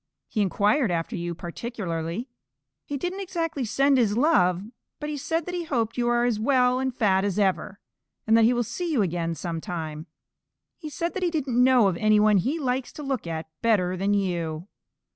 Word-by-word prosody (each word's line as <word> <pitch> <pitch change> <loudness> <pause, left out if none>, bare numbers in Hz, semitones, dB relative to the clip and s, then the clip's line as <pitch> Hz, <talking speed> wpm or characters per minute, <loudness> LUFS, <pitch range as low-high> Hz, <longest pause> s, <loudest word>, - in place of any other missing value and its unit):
He 215 - -1
inquired 205 - +2
after 165 -2 -2
you 170 -1 -4
particularly. 175 +1 -4 0.6
He 285 - -4
didn't 355 +7 -3
exactly 330 -7 -3
send 275 +4 +3
his 215 -3 +2
love, 195 - +3 0.4
but 300 0 -4
he 295 - -3
said 325 +3 -2
that 360 - -5
he 350 -1 -2
hoped 230 -7 -1
you 240 -1 +1
are 240 0 +2
as 235 -3 0
well 250 +1 +3
and 260 0 0
fat 195 -6 +2
as 200 -2 -1
ever, 200 0 0 0.5
and 220 - +4
that 230 - +5
he 235 - +5
will 240 -1 +1
see 345 - -4
you 250 -9 +2
again 170 -2 -2
some 165 +1 -4
time. 160 -2 -5 0.7
He 310 - -6
said 335 +3 -3
that 385 - -4
he 360 - +2
didn't 265 -7 +1
know 250 -4 +5
of 180 -3 0
any 215 +1 +4
one 210 -1 +5
he 260 - 0
likes 260 -3 -2
to 300 - -8
look 265 -9 -3
at 160 -1 -4 0.2
better 190 -6 +2
than 195 +3 +1
you." 170 -3 -2
225 Hz, 200 wpm, -25 LUFS, 185-270 Hz, 0.7 s, that